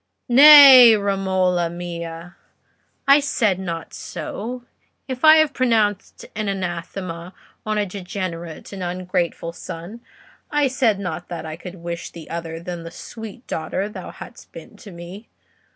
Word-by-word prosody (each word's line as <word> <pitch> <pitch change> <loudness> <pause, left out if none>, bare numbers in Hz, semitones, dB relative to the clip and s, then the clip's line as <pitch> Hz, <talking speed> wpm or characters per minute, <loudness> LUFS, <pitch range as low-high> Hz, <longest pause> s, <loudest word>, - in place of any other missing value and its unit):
"Nay, 265 -3 +10
Romola 190 -3 0
mia, 170 0 -7 0.7
I 280 +1 +7
said 220 -9 0
not 170 -3 -6
so; 245 +4 -7 0.4
if 260 0 -6
I 310 0 +8
have 310 -2 +3
pronounced 220 -6 0
an 215 0 -3
anathema 180 -1 -5 0.3
on 215 0 -1
a 210 - 0
degenerate 180 -3 -7
and 195 - -7
ungrateful 180 -1 -3
son, 170 +7 -9 0.5
I 295 -2 +1
said 240 -5 +1
not 180 -3 -6
that 170 -2 -6
I 155 0 -6
could 180 +2 -10
wish 170 -1 -6
thee 165 -2 -12
other 165 -1 -6
than 175 0 -7
the 165 - -8
sweet 225 +6 -10
daughter 165 +5 -3
thou 210 - -9
hast - - -13
been - - -12
to 210 - -13
me. 175 +5 -11
185 Hz, 140 wpm, -21 LUFS, 170-225 Hz, 0.7 s, Nay